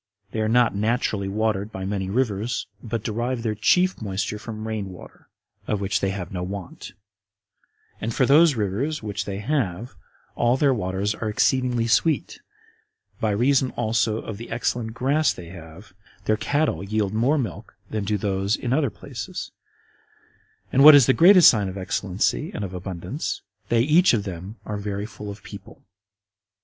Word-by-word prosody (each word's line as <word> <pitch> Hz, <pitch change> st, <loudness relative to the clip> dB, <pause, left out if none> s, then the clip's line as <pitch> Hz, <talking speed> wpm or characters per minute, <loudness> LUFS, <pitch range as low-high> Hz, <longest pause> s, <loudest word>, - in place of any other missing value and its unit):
They 110 Hz, -, -2 dB
are 110 Hz, -, 0 dB
not 120 Hz, 0 st, +4 dB
naturally 105 Hz, -1 st, 0 dB
watered 105 Hz, 0 st, -1 dB
by 95 Hz, -2 st, -5 dB
many 95 Hz, -1 st, -2 dB
rivers, 115 Hz, 0 st, -1 dB, 0.2 s
but 115 Hz, -2 st, -4 dB
derive 120 Hz, +2 st, -2 dB
their 110 Hz, -2 st, 0 dB
chief 180 Hz, -, +2 dB
moisture 100 Hz, 0 st, -3 dB
from 110 Hz, 0 st, -7 dB
rain 105 Hz, -3 st, -3 dB
water, 90 Hz, -, -14 dB, 0.4 s
of 105 Hz, -, 0 dB
which 100 Hz, 0 st, 0 dB
they 95 Hz, -, 0 dB
have 95 Hz, -2 st, -5 dB
no 90 Hz, -2 st, -4 dB
want; 95 Hz, 0 st, -7 dB, 1.1 s
and 115 Hz, -, -2 dB
for 130 Hz, -, +2 dB
those 150 Hz, +2 st, +5 dB
rivers 115 Hz, +8 st, -2 dB
which 100 Hz, -1 st, -3 dB
they 100 Hz, -1 st, -4 dB
have, 115 Hz, -3 st, -2 dB, 0.4 s
all 120 Hz, +2 st, +2 dB
their 140 Hz, -1 st, +3 dB
waters 100 Hz, -1 st, -1 dB
are 110 Hz, +1 st, -4 dB
exceeding 125 Hz, +1 st, +1 dB
sweet: 155 Hz, +7 st, +1 dB, 0.8 s
by 110 Hz, -, 0 dB
reason 130 Hz, +5 st, +2 dB
also 110 Hz, -1 st, +1 dB
of 110 Hz, -2 st, -6 dB
the 115 Hz, -, -8 dB
excellent 115 Hz, 0 st, -2 dB
grass 140 Hz, +4 st, +2 dB
they 85 Hz, -2 st, -10 dB
have, 85 Hz, +2 st, -12 dB, 0.3 s
their 110 Hz, -, +3 dB
cattle 145 Hz, +3 st, 0 dB
yield 105 Hz, 0 st, -1 dB
more 125 Hz, +8 st, +2 dB
milk 115 Hz, -, -5 dB, 0.2 s
than 110 Hz, -2 st, -2 dB
do 105 Hz, +1 st, 0 dB
those 100 Hz, +1 st, 0 dB
in 125 Hz, 0 st, -2 dB
other 140 Hz, -2 st, +2 dB
places; -, -, -7 dB, 1.2 s
and, 135 Hz, -, +5 dB
what 150 Hz, 0 st, +11 dB
is 140 Hz, -4 st, +7 dB
the 130 Hz, -, +4 dB
greatest 180 Hz, +3 st, +8 dB
sign 105 Hz, -4 st, +4 dB
of 95 Hz, -, -7 dB
excellency 95 Hz, -8 st, -1 dB
and 105 Hz, -, -3 dB
of 95 Hz, -, -8 dB
abundance, 90 Hz, -, -5 dB, 0.3 s
they 115 Hz, -1 st, +3 dB
each 155 Hz, +3 st, +4 dB
of 105 Hz, -, -1 dB
them 95 Hz, +2 st, -7 dB
are 105 Hz, -, -4 dB
very 100 Hz, 0 st, -4 dB
full 105 Hz, -1 st, -9 dB
of 100 Hz, 0 st, -9 dB
people. 100 Hz, +6 st, -12 dB
110 Hz, 170 wpm, -24 LUFS, 100-125 Hz, 1.2 s, what